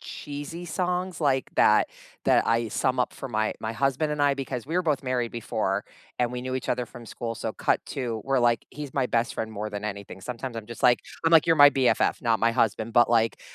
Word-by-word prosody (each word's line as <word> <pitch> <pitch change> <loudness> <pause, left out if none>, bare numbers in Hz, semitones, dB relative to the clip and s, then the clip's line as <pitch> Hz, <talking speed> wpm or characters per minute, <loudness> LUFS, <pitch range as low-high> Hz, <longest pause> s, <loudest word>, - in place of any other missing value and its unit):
cheesy 145 +4 -7
songs 180 +1 -2
like 135 -4 +1
that, - - +5 0.4
that - - +4
I 115 0 +1
sum 130 +4 0
up 125 - +1
for 135 - -7
my 110 -2 0
my 110 +1 -3
husband 135 +5 0
and 150 -1 -1
I 145 - +4
because 130 -2 -5
we 160 - -4
were 180 - +2
both 150 -5 0
married 125 -3 -1
before 115 -2 -2 0.3
and 125 -1 0
we 125 - -4
knew 130 +1 -4
each 130 - -4
other 125 0 -1
from 120 -1 -12
school, 115 +1 -5
so - - -4
cut - - 0
to, 115 -5 -4
we're 135 -1 +1
like 120 -2 +2
he's 145 -2 -8
my 135 - +2
best 115 -1 0
friend 110 0 -4
more 105 0 -4
than 105 0 -6
anything, 100 -2 -6
sometimes 125 +2 -5
I'm 110 -2 -6
just, 120 0 -9
like 125 -1 +5 0.2
I'm, 165 - +3
like, 165 - +7
"You're 165 -1 +4
my 145 -1 +9
BFF, 135 -2 +1
not 115 -2 +2
my 115 - +4
husband," 115 -1 0
but, 120 -1 +5
like, 115 -1 +2
125 Hz, 235 wpm, -26 LUFS, 115-140 Hz, 0.4 s, my